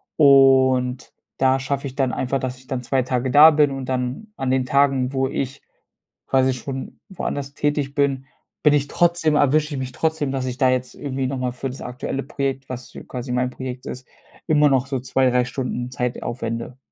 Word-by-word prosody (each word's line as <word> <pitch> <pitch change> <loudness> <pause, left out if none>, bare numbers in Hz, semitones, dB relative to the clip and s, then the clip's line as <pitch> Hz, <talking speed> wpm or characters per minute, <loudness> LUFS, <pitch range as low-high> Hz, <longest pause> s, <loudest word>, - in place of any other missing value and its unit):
Und 130 -3 +4 0.3
da 130 0 +3
schaffe 140 +1 -2
ich 130 - -9
dann 135 -3 0
einfach, 135 +1 -1
dass 130 -1 -4
ich 130 0 -19
dann 130 -2 -3
2 130 +1 0
Tage 125 +1 -1
da 150 +5 +8
bin 150 -2 +3
und 135 -1 -5
dann 130 - -2
an 130 - -2
den 130 -1 +1
Tagen, 135 -1 +2
wo 135 0 +1
ich 135 +1 -4 0.7
quasi 130 0 +3
schon 130 +1 -6
woanders 145 -7 -4
tätig 145 -1 -1
bin, 140 -2 +1 0.4
bin 150 -1 +5
ich 145 -1 +2
trotzdem 170 -2 +2
erwische 150 +1 +2
ich - - -3
mich 130 -1 -4
trotzdem, 160 -4 -1
dass 135 -1 -2
ich 125 -1 -4
da 130 -1 +3
jetzt 130 0 -1
irgendwie 135 -2 -3
nochmal 130 -1 -2
für 130 +2 -4
das 130 - -9
aktuelle 125 +2 -4
Projekt, 135 -1 -3
was 125 -1 -7
ja - - -9
quasi 125 0 -6
mein 125 0 0
Projekt 130 0 -7
ist, 125 0 -7 0.4
immer 150 -2 +4
noch 135 -1 +2
so 135 -2 -2
2, 130 +1 +1
3 125 0 +2
Stunden 125 -1 -4
Zeit 125 0 -3
aufwende. 115 +1 -4
130 Hz, 200 wpm, -22 LUFS, 125-140 Hz, 0.7 s, da